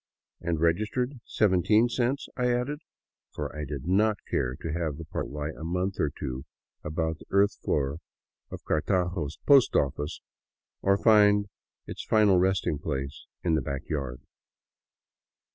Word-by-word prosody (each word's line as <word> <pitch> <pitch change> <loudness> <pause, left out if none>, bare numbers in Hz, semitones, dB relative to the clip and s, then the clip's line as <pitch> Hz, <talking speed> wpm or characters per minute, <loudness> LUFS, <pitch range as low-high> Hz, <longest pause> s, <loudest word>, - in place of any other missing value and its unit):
"And 85 -2 -1
registered, 110 - 0
seventeen 105 +3 +3
cents?" 125 +3 -1
I 125 -1 +1
added; 125 +5 -1 0.5
for 75 -1 -5
I 75 -1 -4
did 70 -1 -6
not 105 +3 +3
care 60 0 0
to 80 +3 -5
have 80 -4 -2
the 80 - -7
parcel 75 - -4
lie 75 +1 -3
a - - -9
month 90 +3 -2
or 75 - +2
two 65 -1 -5 0.4
about 80 +1 -2
the - - -15
earth 100 +1 +3
floor 70 +2 0 0.5
of - - -8
Cartago's 90 -2 0
post 140 -3 +6
office, 75 +2 0 0.6
or 100 0 +3
find 105 -2 +5 0.4
its - - -6
final 105 -4 +4
resting 95 -5 +1
place 70 -2 -4 0.2
in 85 - +2
the 80 - +2
back 70 +1 -5
yard. 70 -5 -3
85 Hz, 145 wpm, -28 LUFS, 75-105 Hz, 0.6 s, post